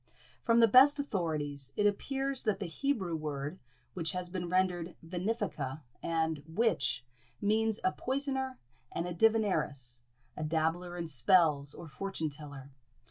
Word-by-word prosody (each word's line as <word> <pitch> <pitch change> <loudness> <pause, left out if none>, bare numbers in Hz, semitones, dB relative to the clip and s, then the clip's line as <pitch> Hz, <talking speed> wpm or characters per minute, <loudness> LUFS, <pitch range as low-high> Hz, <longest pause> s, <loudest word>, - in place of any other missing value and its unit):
From 230 0 +4
the 230 - +8
best 270 +6 +7
authorities, 150 - -2
it 205 - +2
appears 270 +6 0
that 210 -3 0
the 200 - -3
Hebrew 190 -2 -1
word, 150 +1 -4 0.3
which 170 -1 -1
has 180 -1 -4
been 180 -2 -3
rendered 180 -1 +1
venefica 170 - -2 0.2
and 160 -2 0
witch, 160 - +1 0.3
means 220 +1 +2
a 185 - +3
poisoner 265 +1 -1 0.3
and 170 - -2
divineress, 175 - +2 0.4
a 155 - -4
dabbler 165 +3 -1
in 170 - -3
spells, 150 -1 +3
or 170 - -9
fortune 160 -1 -3
teller. 140 -2 -10
175 Hz, 135 wpm, -32 LUFS, 155-220 Hz, 0.4 s, the